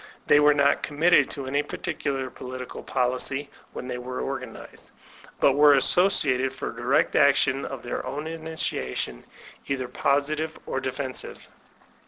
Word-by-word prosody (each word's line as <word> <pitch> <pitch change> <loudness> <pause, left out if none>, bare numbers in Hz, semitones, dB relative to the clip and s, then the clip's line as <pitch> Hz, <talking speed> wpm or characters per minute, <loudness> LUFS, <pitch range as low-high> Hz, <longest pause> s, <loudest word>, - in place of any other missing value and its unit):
They 145 - +6
were 150 0 +5
not 140 0 +3
committed 155 +4 +3
to 140 -2 -5
any 140 +2 0
particular 140 -5 -4
political 125 0 -8
policy 130 +3 -1 0.2
when 125 - -7
they 125 -1 -4
were 125 +1 -5
organized, 135 -1 -7 0.5
but 140 - +5
were 145 0 +6
as 135 - +4
sociated 135 -9 +3
for 130 - -5
direct 120 +4 +1
action 140 -1 +3
of 135 -3 -7
their 120 - -4
own 150 +2 -5
initiation, 160 - -4 0.4
either 130 -2 -2
positive 150 +5 0
or 135 - -2
defensive. 130 0 -5
135 Hz, 140 wpm, -25 LUFS, 130-145 Hz, 0.5 s, They